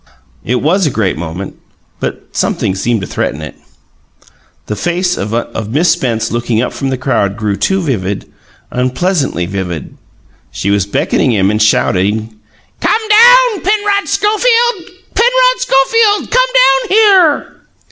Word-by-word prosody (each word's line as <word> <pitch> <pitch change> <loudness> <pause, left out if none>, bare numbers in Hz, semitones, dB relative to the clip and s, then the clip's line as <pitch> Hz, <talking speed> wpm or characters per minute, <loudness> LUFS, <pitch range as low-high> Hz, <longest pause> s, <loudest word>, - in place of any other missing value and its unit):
It 125 +2 -2
was 180 +3 +2
a - - +1
great 110 -7 -1
moment, 85 +4 -7 0.4
but - - -5
something - - -1
seemed 110 +3 -1
to - - -4
threaten 75 - -3
it. 75 - -8 1.1
The 105 - -4
face 180 - -1
of 110 0 -4
Miss 160 +8 +2
Spence 115 -7 -1
looking 120 -1 -1
up 125 - -2
from 135 - -3
the 130 - -2
crowd 105 -7 -1
grew 105 -3 -2
too 190 - 0
vivid 100 - -3 0.5
unpleasantly 130 - -1
vivid. 90 -4 -5 0.5
She 100 - -3
was 100 -1 0
beckoning 125 +5 0
him 100 -1 +2
and 105 +1 -1
shouting, 105 +1 +1 0.5
"Come 440 - +1
down, 480 0 +5
Penrod 410 0 0
Schofield! 460 -2 +1 0.2
Penrod - - +3
Schofield, 420 - +2
come - - +3
down 270 - +3
here!" 385 -7 +3
135 Hz, 135 wpm, -13 LUFS, -, 1.1 s, down